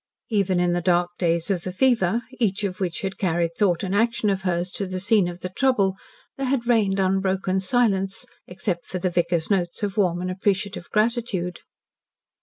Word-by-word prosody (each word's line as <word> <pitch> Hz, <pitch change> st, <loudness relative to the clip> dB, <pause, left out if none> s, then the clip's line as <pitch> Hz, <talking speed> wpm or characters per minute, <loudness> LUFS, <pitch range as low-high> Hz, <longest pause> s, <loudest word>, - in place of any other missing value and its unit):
Even 195 Hz, -4 st, +2 dB
in 175 Hz, 0 st, +2 dB
the 175 Hz, -, 0 dB
dark 175 Hz, 0 st, +2 dB
days 170 Hz, +1 st, +1 dB
of 180 Hz, -3 st, 0 dB
the 185 Hz, -, -4 dB
fever, 230 Hz, -1 st, +2 dB, 0.2 s
each 210 Hz, -3 st, 0 dB
of 185 Hz, -2 st, -2 dB
which 180 Hz, -3 st, -2 dB
had 195 Hz, -1 st, -4 dB
carried 170 Hz, -2 st, 0 dB
thought 180 Hz, -3 st, +2 dB
and 190 Hz, 0 st, -2 dB
action 225 Hz, 0 st, +2 dB
of 190 Hz, -1 st, -1 dB
hers 180 Hz, -1 st, -1 dB
to 200 Hz, 0 st, -3 dB
the 185 Hz, 0 st, -4 dB
scene 205 Hz, -1 st, +3 dB
of 175 Hz, +1 st, -7 dB
trouble, 205 Hz, -8 st, +2 dB, 0.4 s
there 270 Hz, -1 st, -2 dB
had 255 Hz, -2 st, 0 dB
reigned 210 Hz, -5 st, +2 dB
unbroken 190 Hz, 0 st, +1 dB
silence, 195 Hz, -2 st, +1 dB, 0.2 s
except 180 Hz, -1 st, -3 dB
for 185 Hz, -, -4 dB
the 180 Hz, 0 st, -1 dB
vicar's 170 Hz, 0 st, 0 dB
notes 175 Hz, -1 st, 0 dB
of 200 Hz, 0 st, -2 dB
warm 180 Hz, -4 st, +2 dB
and 180 Hz, +1 st, -2 dB
appreciative 195 Hz, -1 st, -1 dB
gratitude. 215 Hz, -5 st, 0 dB
190 Hz, 185 wpm, -24 LUFS, 180-205 Hz, 0.4 s, scene